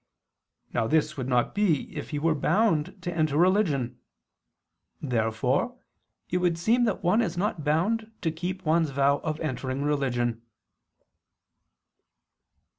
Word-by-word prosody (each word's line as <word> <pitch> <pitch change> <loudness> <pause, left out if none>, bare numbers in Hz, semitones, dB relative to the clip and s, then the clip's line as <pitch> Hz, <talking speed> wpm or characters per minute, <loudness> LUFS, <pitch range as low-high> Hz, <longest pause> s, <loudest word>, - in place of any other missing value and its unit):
Now 110 - +1
this 155 +2 +1
would 130 -2 -4
not 125 -2 +1
be 190 -9 0
if - - -5
he 150 - -3
were 160 +2 +2
bound 165 +2 +1
to 175 -1 -3
enter 155 -3 +1
religion. 170 - +2 1.0
Therefore 125 - 0 0.5
it 180 - +2
would 175 -2 +1
seem 230 +8 +2
that 210 -2 -1
one 180 +6 +3
is 175 -6 -2
not 185 -4 -1
bound 210 +10 0
to 165 - 0
keep 180 +3 -5
one's 160 0 +2
vow 140 +1 +2
of 155 -1 -3
entering 135 -2 -3
religion. 120 -5 0
155 Hz, 130 wpm, -27 LUFS, 140-185 Hz, 1.0 s, one